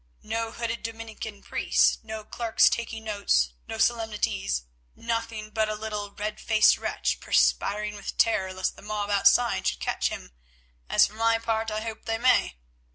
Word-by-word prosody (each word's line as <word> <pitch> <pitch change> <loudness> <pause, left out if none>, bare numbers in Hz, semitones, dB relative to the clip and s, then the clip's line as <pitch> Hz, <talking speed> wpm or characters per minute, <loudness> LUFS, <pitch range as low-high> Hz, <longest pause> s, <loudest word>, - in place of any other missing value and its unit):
No 225 +1 -2
hooded 230 0 -4
Dominican 225 -2 -7
priests, - - +2
no 220 -1 -7
clerks 230 0 +3
taking 230 -1 -3
notes, 200 - +1
no 225 - -5
solemnities, 220 - 0 0.3
nothing 230 -2 -3
but 220 0 0
a 215 - -2
little 210 -1 -4
red 210 +1 -5
faced 220 -1 +5
wretch, - - -1
perspiring 210 +1 +1
with 200 - -7
terror 190 -4 +2
lest 185 0 -2
the - - -14
mob 205 0 -3
outside 235 +4 +3
should - - -1
catch - - 0
him, - - -8 0.6
as - - +6
for - - -8
my 225 +1 +2
part 225 -1 -1
I 215 0 -3
hope 225 0 -6
they 225 0 -1
may. 245 - +3
220 Hz, 160 wpm, -26 LUFS, 210-230 Hz, 0.6 s, as